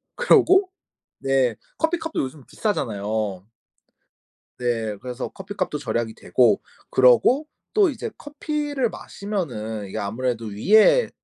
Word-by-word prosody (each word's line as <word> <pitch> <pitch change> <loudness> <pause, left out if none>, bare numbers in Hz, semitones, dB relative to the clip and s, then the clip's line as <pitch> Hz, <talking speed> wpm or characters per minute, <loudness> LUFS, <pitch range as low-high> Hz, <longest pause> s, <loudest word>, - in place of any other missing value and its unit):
그러고 385 -5 +4 0.5
네. 135 -3 +1 0.2
커피값도 325 0 -1
요즘 135 +1 -6
비싸잖아요. 105 - -2 1.2
네. 115 -3 -1
그래서 125 0 -5
커피값도 190 -4 -4
절약이 120 -4 -2
되고 115 -5 +2 0.3
그러고 130 - +4 0.3
또 410 -4 +5
이제 260 -6 -5
커피를 290 -3 -2
마시면은 120 - -5
이게 - - -7
아무래도 115 +3 -2
위에 210 - +4
135 Hz, 260 characters per minute, -23 LUFS, -, 1.2 s, 또